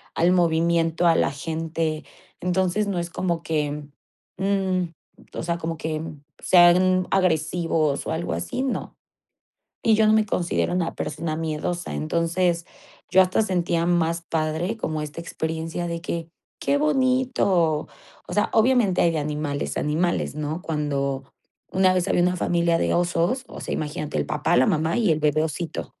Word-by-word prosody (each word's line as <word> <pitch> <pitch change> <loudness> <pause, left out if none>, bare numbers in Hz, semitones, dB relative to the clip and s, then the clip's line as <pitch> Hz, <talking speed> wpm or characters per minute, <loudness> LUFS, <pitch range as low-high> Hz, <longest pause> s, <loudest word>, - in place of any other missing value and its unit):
al 170 +2 +3
movimiento, 170 -1 +2
a 165 - +5
la 135 - +2
gente. 160 +1 -3 0.3
Entonces 185 +3 0
no 190 -3 -1
es 170 0 -3
como 170 -1 -2
que, 150 -2 -2 0.5
mm, 190 -1 +1 0.5
o - - -4
sea, 170 0 -1
como 165 0 -3
que 155 0 -3 0.4
sean 185 +1 +5
agresivos 160 -4 +1
o - - -2
algo 160 +2 -2
así, 255 - -3
no. 270 - -3 0.9
Y 225 - +5
yo 220 0 +4
no - - +5
me 220 0 +4
considero 175 -3 -1
una 175 -2 -1
persona 155 +1 -3
miedosa. 165 +2 -3
Entonces, 170 +2 0 0.4
yo 185 +2 +6
hasta 185 +3 +2
sentía 175 -4 0
más 170 -1 +1
padre, 165 +4 -1
como 155 -8 -3
esta 150 +2 -6
experiencia 165 +1 -4
de 170 0 -4
que: 170 -1 -4 0.3
"Qué 285 - +1
bonito". 255 - +2 0.4
O - - -6
sea, 210 - +2
obviamente 225 -5 +3
hay 170 - +4
de 160 - -1
animales, 150 -1 -3
animales, 160 +3 0
¿no? 155 +3 -3
Cuando, 140 -4 -2 0.5
una 185 0 +4
vez 180 -1 0
había 175 - +3
una 180 0 +2
familia 170 -1 +2
de - - +1
osos, 175 +8 +1
o - - -9
sea, - - -5
imagínate 150 0 -3
el - - 0
papá, 150 - +1
la 130 - +5
mamá 160 - +1
y 220 -7 +3
el 155 - +1
bebé 155 0 +2
osito. 160 +1 -5
170 Hz, 160 wpm, -24 LUFS, 155-185 Hz, 0.9 s, yo